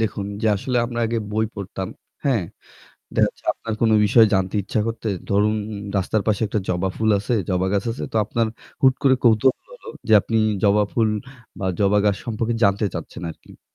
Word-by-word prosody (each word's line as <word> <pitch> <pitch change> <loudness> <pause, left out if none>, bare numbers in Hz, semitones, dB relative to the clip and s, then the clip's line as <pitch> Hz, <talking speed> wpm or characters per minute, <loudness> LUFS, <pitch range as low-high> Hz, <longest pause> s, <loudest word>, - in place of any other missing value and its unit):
দেখুন, 105 -2 -2 0.2
যে - - +2
আসলে 125 +5 -2
আমরা 120 0 -5
আগে 115 0 -1
বই 110 +1 +1
পড়তাম, 95 -2 -5 0.4
হ্যাঁ? 120 -9 +2 0.7
দেখা - - +4
যাচ্ছে - - -16
আপনার 115 - -5
কোনো 110 -1 +4
বিষয় 110 +2 +6
জানতে 95 0 0
ইচ্ছা 105 +3 -1
করতে 115 -1 -3 0.2
ধরুন, 105 +2 +2 0.4
রাস্তার 100 +2 0
পাশে 110 0 +1
একটা 105 - -1
জবা 90 +1 0
ফুল 110 0 +1
আছে, 115 +5 -1 0.2
জবা 90 0 +1
গাছ 100 -1 0
আছে, 115 - -5
তো - - -2
আপনার 115 +2 0 0.4
হুট 130 -1 +6
করে 135 -2 +5
কৌতূহল 120 +3 +4
হলো - - -13 0.2
যে - - +3
আপনি 115 +3 -1 0.3
জবা 105 +1 +4
ফুল 115 -2 +2 0.5
বা 95 - -2
জবা 100 +1 +4
গাছ 100 -2 +3
সম্পর্কে 115 0 -1
জানতে 100 +2 +2
চাচ্ছেন - - -7
আরকি। - - -15
হুম - - -53
110 Hz, 190 wpm, -22 LUFS, 100-115 Hz, 0.7 s, বিষয়